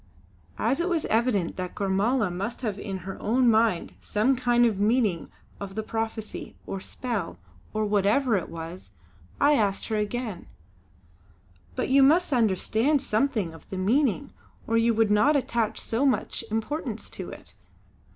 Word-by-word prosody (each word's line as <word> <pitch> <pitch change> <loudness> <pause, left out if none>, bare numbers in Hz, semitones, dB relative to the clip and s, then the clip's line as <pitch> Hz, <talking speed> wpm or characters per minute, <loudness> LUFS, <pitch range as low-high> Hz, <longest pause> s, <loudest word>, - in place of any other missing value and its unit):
As 275 - +1
it 345 +2 0
was 335 -3 0
evident 220 -6 +1
that 180 -1 -5
Gormala 200 +2 +1
must 200 +8 -4
have 210 -5 -3
in 195 -2 -4
her 195 - -7
own 240 +3 +3
mind 220 -5 +2
some 225 +6 +1
kind 240 -1 +3
of 215 -4 +1
meaning 210 -5 +1 0.3
of 195 -1 -7
the 220 - -2
prophecy, 220 -1 -4
or 195 - -5
spell, 205 - -4 0.3
or 215 0 -1
whatever 210 +5 +2
it 185 - -2
was, 165 - -8 0.5
I 290 +1 +5
asked 205 -7 0
her 220 - 0
again: 210 -2 -3 1.3
"But 255 - -1
you 275 +1 +5
must 310 +3 +4
understand 230 +5 +2
something 220 -8 0
of 165 - -15
the 190 - -5
meaning, 220 - +1 0.3
or 230 - -1
you 230 0 +3
would 220 -1 +3
not 240 +9 +4
attach 235 -5 0
so 230 +4 -1
much 265 -3 0
importance 225 +1 -3
to - - -7
it?" - - -12
220 Hz, 155 wpm, -26 LUFS, 200-250 Hz, 1.3 s, I